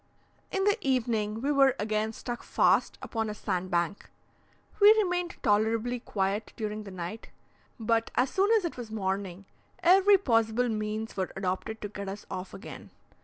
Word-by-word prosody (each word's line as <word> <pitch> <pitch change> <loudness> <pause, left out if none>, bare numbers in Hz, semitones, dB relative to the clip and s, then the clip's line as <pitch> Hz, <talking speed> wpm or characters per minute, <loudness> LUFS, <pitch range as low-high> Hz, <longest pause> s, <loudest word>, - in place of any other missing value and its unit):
In 385 - -1
the 410 +3 +2
evening, 225 -5 0
we 285 - +1
were 270 -2 +4
again 215 +1 -1
stuck 240 +2 -6
fast - - +2
upon 225 -2 -2
a 210 - -5
sandbank. 180 -1 -2 0.7
We 410 0 +9
remained 360 -5 0
tolerably 225 +4 +1
quiet 205 -1 -2
during 215 -1 -4
the - - -7
night, 185 +4 -7 0.5
but, 225 0 +1
as 255 +1 +2
soon 390 +2 +2
as 435 -5 +3
it 335 - -4
was 240 -3 -7
morning, 195 -2 -3 0.4
every 390 +3 +6
possible 230 - +1
means 215 0 -3
were 190 -1 -2
adopted 190 +3 -3
to 205 - -3
get 200 -1 -6
us 200 +2 -7
off 185 0 -5
again. 200 - -10
220 Hz, 160 wpm, -29 LUFS, 200-255 Hz, 0.7 s, We